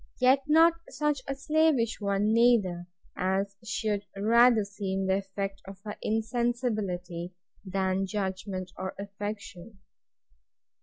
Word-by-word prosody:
Yet 260 +2 +5
not 325 +2 +6 0.2
such 295 -3 -1
a 275 - -2
slavish 280 -6 +2
one 200 +1 +1
neither, 210 -7 +3 0.3
as 195 +2 -1
should 215 -2 -1
rather 230 +2 +5
seem 195 -1 -3
the 190 0 +2
effect 195 0 -4
of 195 0 -10
her 210 -1 -6
insensibility, 215 -7 -2 0.3
than 190 0 -1
judgment 190 -2 -3
or 190 0 -4
affection. 205 0 -7
205 Hz, 110 wpm, -28 LUFS, 190-235 Hz, 0.3 s, not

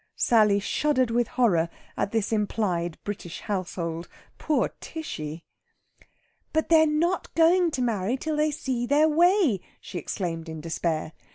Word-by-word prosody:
Sally 215 -3 +4
shuddered 255 +3 +1
with 240 0 +1
horror 175 -10 +2 0.3
at 200 - -1
this 225 -2 0
implied 195 -6 -1
British 195 -4 -6
household. 175 -4 -3 0.3
Poor 310 - +1
Tishy! 165 - -6 1.1
"But 315 0 0
they're 320 -1 +6
not 335 +4 0
going 340 +2 +5
to 265 -5 -2
marry 225 0 0
till 310 +3 -2
they 305 +1 +2
see 260 -5 -2
their 295 +3 +4
way," 335 - +4 0.2
she 175 - -6
exclaimed 165 -1 -4
in 160 0 -6
despair. 160 0 -2
230 Hz, 140 wpm, -26 LUFS, -, 1.1 s, they're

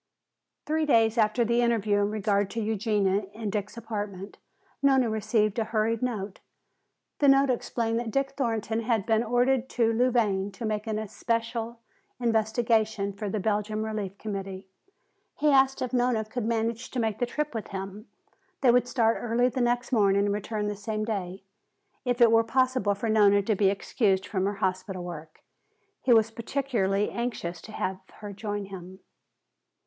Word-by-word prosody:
Three 310 0 0
days 225 -4 +4
after 220 +2 +3
the 235 +1 +2
interview 220 -4 +2
in 205 0 +1
regard 205 -2 0
to 230 - -4
Eugenia 210 -2 0
in 215 -1 -4
Dick's 210 +2 -4
apartment, 205 -3 -6 0.4
Nona 265 -4 +3
received 215 0 +1
a 220 - 0
hurried 220 +1 0
note. 210 -6 -3 0.8
The 285 - +4
note 275 0 +5
explained 230 -1 -1
that 235 -1 -4
Dick 275 +3 0
Thornton 225 -5 -1
had 225 -3 0
been 225 0 +2
ordered 245 +2 +1
to 230 -2 +1
Louvain 220 -5 +1
to 210 +5 -6
make 215 0 -2
an 215 -1 -1
especial 230 +2 -3 0.4
investigation 220 -3 +1
for 205 +1 -5
the 215 - -2
Belgian 215 +1 -1
Relief 210 -3 -4
Committee. 195 -2 -5 0.7
He 300 +1 +2
asked 270 -1 +4
if 255 - -4
Nona 245 -3 +1
could 220 +1 -4
manage 230 +1 -1
to 255 - -3
make 220 -2 -1
the 245 - 0
trip 300 +3 -3
with 225 -2 -4
him. 195 +2 -7 0.5
They 255 -3 +6
would 245 0 +3
start 230 -3 +2
early 240 +2 +2
the 255 0 -2
next 240 +1 0
morning 200 -4 +3
and 200 - +1
return 210 +1 -3
the 210 - -2
same 215 +1 -3
day. 195 -3 -4 0.6
If 245 0 0
it 235 -1 +7
were 225 0 +5
possible 255 -3 +1
for 210 +3 -3
Nona 205 -2 +4
to 215 +1 +1
be 195 0 +3
excused 195 -1 0
from 190 -3 -1
her 205 - -2
hospital 185 -1 -2
work, 160 -3 -9 0.6
he 255 - +1
was 225 -1 +5
particularly 225 -5 -1
anxious 215 -8 -4
to 215 - -11
have 190 -2 -2 0.2
her 205 -1 -8
join 205 0 -4
him. 190 0 -10
220 Hz, 170 wpm, -27 LUFS, 205-235 Hz, 0.8 s, it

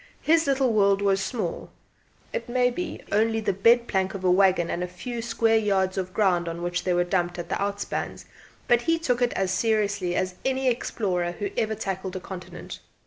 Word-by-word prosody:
His 325 -1 +3
little 265 -3 +2
world 200 -2 +4
was 195 -1 +2
small, 230 +4 -3 0.6
it 480 - -4
may 250 0 +2
be 355 +9 -5
only 225 +2 +2
the 210 -3 0
bedplank 200 -2 +2
of 190 - -6
the 180 - +4
waggon 185 -2 +4
and 175 - -2
the 180 - -1
few 230 +7 -6
square 225 -1 +2
yards 190 -3 +1
of 190 -1 -2
the 185 - -24
ground 180 -5 +2
on 170 +1 -5
which 175 0 -2
they 180 - +2
were 175 - +3
dumped 175 -1 -1
at 175 - -6
the - - -2
outspans 200 0 -3 0.4
but 240 -1 +4
he 330 +6 +2
took 255 -7 0
it 245 - +3
as 190 -1 0
seriously 205 -3 0
as 185 0 -1
any 265 0 0
explorer 185 -7 -1
who 200 +2 -4
ever 220 -1 0
tackled 190 -1 -4
a - - -2
continent. 185 -1 -8
200 Hz, 200 wpm, -25 LUFS, 185-235 Hz, 0.6 s, world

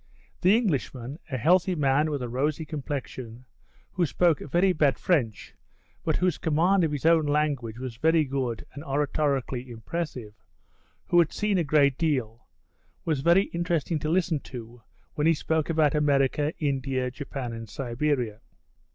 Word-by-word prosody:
The 190 +4 +5
Englishman, 140 - -2
a 130 - -2
healthy 180 +7 +3
man 145 0 +2
with 145 -4 -2
a - - -3
rosy 145 +6 -1
complexion, 130 -5 -6 0.5
who 175 -3 0
spoke 165 0 +2
very 175 +6 +2
bad 150 -4 +2
French, 125 - -1 0.5
but - - 0
whose 180 -3 +1
command 170 +5 +2
of 160 - +1
his 145 0 -4
own 165 -2 +4
language 145 -6 0
was 125 -2 -6
very 160 +4 +3
good 130 -4 -3
and 145 - -8
oratorically 140 -3 -1
impressive, 120 -1 -5 0.7
who 175 - +4
had 165 -3 +3
seen 210 -3 0
a - - +2
great 140 -3 +3
deal, 130 -9 -1 0.6
was 155 -5 0
very 170 +6 +5
interesting 170 -2 -1
to 155 - -3
listen 170 -2 +1
to 120 -2 -10 0.3
when 150 +1 +1
he 165 - +4
spoke 160 +1 -1
about 155 -3 +3
America, 145 0 +2
India, 135 -3 -1
Japan 130 -2 -6
and 115 -1 -7
Siberia. 120 -2 -2
145 Hz, 150 wpm, -26 LUFS, 130-165 Hz, 0.7 s, The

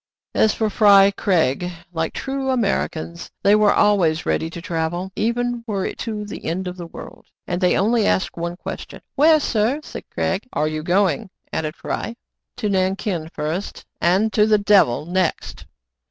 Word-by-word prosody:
As 220 - +4
for 220 -2 0
Fry 200 -2 +6
Craig, 180 -4 +1 0.2
like 160 -1 -2
true 270 0 -3
Americans, 185 -8 -1
they 200 - +5
were 210 -1 +5
always 180 -7 +3
ready 160 - 0
to 170 - -8
travel, 170 +2 -3
even 240 +2 -1
were 200 -3 -1
it - - -5
to 215 -2 -4
the 205 - -8
end 180 +3 -2
of 180 - -5
the 175 -2 -8
world; - - -11 0.2
and 175 +1 -3
they 180 - +3
only 220 +2 +2
asked 190 - 0
one 170 +1 -4
ques - - -6
tion. - - -11
"Where, 310 +2 +5
sir" 240 +1 0
— - - -29
said - - -8
Craig. 195 +6 -2
"Are 155 - +1
you 155 0 -3
going 190 +6 +1
.^" - - -17 0.2
added 155 0 -2
Fry. 230 - -4 0.2
" - - -62
To 230 -4 -1
Nankin 190 -3 -1
first, 160 +6 -4 0.2
and 195 +5 +2
to 210 +1 +4
the 215 -1 +5
devil 200 - +3
next." 180 0 -2
195 Hz, 185 wpm, -21 LUFS, 170-215 Hz, 0.2 s, Fry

